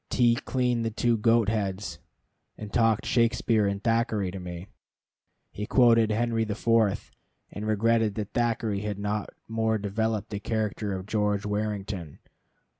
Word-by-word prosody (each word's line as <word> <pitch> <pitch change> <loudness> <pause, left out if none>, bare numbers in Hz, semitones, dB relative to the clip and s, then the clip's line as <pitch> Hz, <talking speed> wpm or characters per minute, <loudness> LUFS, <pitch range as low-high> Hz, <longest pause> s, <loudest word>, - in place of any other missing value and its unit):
T 120 -1 +4
cleaned 125 -1 0
the 115 - 0
two 115 +2 +1
goat 115 0 +3
heads, 100 -2 -2 0.6
and 105 -2 -8
talked 115 -3 +2
Shakspere 115 -2 +2
and 100 0 -3
Thackeray 115 -4 +1
to 95 - -6
me. 90 0 -7 0.9
He 105 +1 -5
quoted 115 -3 +5
Henry 115 +1 +1
the 105 -2 -3
Fourth, 115 -3 +1 0.4
and 105 +1 -5
regretted 110 0 +2
that 105 -2 -5
Thackeray 115 -4 0
had 105 -1 -3
not 105 +1 -2 0.2
more 110 0 0
developed 105 +1 -2
the 100 - -3
character 105 -2 -2
of 95 0 -6
George 105 -1 0
Warrington. 105 -6 -3
110 Hz, 145 wpm, -27 LUFS, 100-115 Hz, 0.9 s, quoted